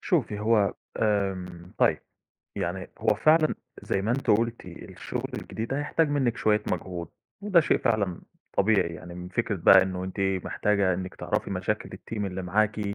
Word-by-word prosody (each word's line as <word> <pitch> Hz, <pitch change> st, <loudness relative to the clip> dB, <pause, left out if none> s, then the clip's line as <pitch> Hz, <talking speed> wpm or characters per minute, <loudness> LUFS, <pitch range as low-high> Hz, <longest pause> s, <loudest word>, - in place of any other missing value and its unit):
شوفي، 130 Hz, -, 0 dB
هو 105 Hz, -2 st, +3 dB, 0.2 s
آمم، 95 Hz, -5 st, -1 dB
طيب، -, -, +4 dB, 0.6 s
يعني 90 Hz, +2 st, -3 dB
هو -, -, +2 dB
فعلًا 155 Hz, +8 st, +4 dB, 0.3 s
زي 95 Hz, -, -1 dB
ما 110 Hz, -, -1 dB
أنتِ 135 Hz, +3 st, -2 dB
قلتِ 115 Hz, +1 st, +1 dB
الشغل 85 Hz, -2 st, -6 dB
الجديد 115 Hz, +1 st, -5 dB
ده، 135 Hz, -, -1 dB
هيحتاج 150 Hz, +2 st, +1 dB
منِّك 130 Hz, -5 st, +1 dB
شوية 105 Hz, 0 st, +2 dB
مجهود، 85 Hz, -2 st, -4 dB, 0.3 s
وده 195 Hz, -4 st, +5 dB
شيء 155 Hz, -, +2 dB
فعلًا 105 Hz, -7 st, 0 dB, 0.4 s
طبيعي، 100 Hz, -5 st, +3 dB
يعني 90 Hz, 0 st, -9 dB
من 90 Hz, 0 st, -7 dB
فكرة 105 Hz, +2 st, -1 dB
بقى 95 Hz, +2 st, +7 dB
إنه 95 Hz, -1 st, -3 dB
أنتِ 95 Hz, +2 st, -5 dB, 0.2 s
محتاجة 100 Hz, -3 st, +1 dB
إنِّك 95 Hz, +1 st, -5 dB
تعرفي -, -, -2 dB
مشاكل -, -, -2 dB
الteam 105 Hz, -2 st, -4 dB
اللي 95 Hz, -1 st, -4 dB
معاكِ، 105 Hz, +4 st, +1 dB
105 Hz, 160 wpm, -27 LUFS, 95-115 Hz, 0.6 s, بقى